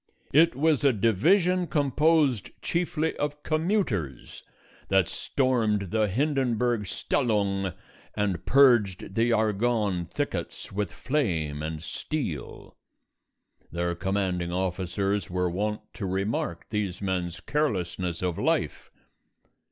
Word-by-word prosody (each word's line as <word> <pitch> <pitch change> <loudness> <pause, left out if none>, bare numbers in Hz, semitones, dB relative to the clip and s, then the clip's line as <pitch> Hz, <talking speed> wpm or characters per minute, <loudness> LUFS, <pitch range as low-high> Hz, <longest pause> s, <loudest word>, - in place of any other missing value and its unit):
It 165 +1 +5
was 150 0 +2
a 140 -2 +5
Division 175 - +3
composed 145 - +2
chiefly 165 -2 -1
of 145 0 -3
commuters 155 - -1 0.5
that 95 -3 +4
stormed 110 -8 0
the 110 -1 +2
Hindenburg 120 -2 +1
Stellung 100 -1 0 0.4
and 105 -4 -1
purged 120 -10 +4
the 115 +3 +2
Argonne 110 -4 +1
thickets - - -4
with 100 -2 -2
flame 90 - -1
and 80 0 -4
steel. 125 - -5 1.0
Their 85 +1 -1
commanding 90 -1 -1
officers 95 +2 -1
were 90 0 0
wont 105 +4 -2
to 100 - -4
remark 95 -2 -2
these 100 -4 -2
men's 90 -3 -2
carelessness 90 - -1
of 90 -2 -1
life. - - 0
105 Hz, 105 wpm, -27 LUFS, 90-135 Hz, 1.0 s, It